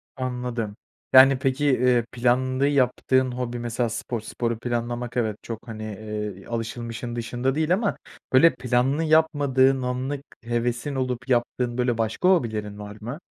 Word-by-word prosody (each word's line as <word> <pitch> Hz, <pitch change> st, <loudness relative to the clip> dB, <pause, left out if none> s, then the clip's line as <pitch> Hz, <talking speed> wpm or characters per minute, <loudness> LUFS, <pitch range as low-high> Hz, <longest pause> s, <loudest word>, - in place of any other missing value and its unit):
Anladım. 125 Hz, -4 st, -3 dB, 0.4 s
Yani, 130 Hz, 0 st, +8 dB
peki, 135 Hz, +2 st, 0 dB
eee, 125 Hz, -3 st, +3 dB
planlı 130 Hz, +3 st, +1 dB
yaptığın 130 Hz, -1 st, +2 dB
hobi 120 Hz, -1 st, -4 dB
mesela 120 Hz, 0 st, -1 dB
spor. 115 Hz, 0 st, -4 dB
Sporu 115 Hz, 0 st, -3 dB
planlamak, 120 Hz, 0 st, -3 dB
evet, 110 Hz, -3 st, 0 dB
çok, 115 Hz, 0 st, -7 dB
hani, 110 Hz, -1 st, -6 dB
eee, 105 Hz, -2 st, -5 dB
alışılmışın 115 Hz, +1 st, -4 dB
dışında 120 Hz, +3 st, -1 dB
değil 160 Hz, +3 st, +2 dB
ama, 200 Hz, +1 st, 0 dB, 0.4 s
böyle, 165 Hz, +6 st, +6 dB
planlı 130 Hz, +5 st, +1 dB
yapmadığın 145 Hz, -4 st, +3 dB
anlık 130 Hz, +3 st, -2 dB, 0.2 s
hevesin 120 Hz, +4 st, -2 dB
olup 125 Hz, -1 st, -3 dB
yaptığın, 120 Hz, 0 st, 0 dB
böyle, 125 Hz, -2 st, +1 dB
başka 115 Hz, +11 st, +1 dB
hobilerin 110 Hz, -, 0 dB
var 105 Hz, 0 st, -8 dB
mı? 120 Hz, +8 st, -6 dB
125 Hz, 140 wpm, -24 LUFS, 115-130 Hz, 0.4 s, Yani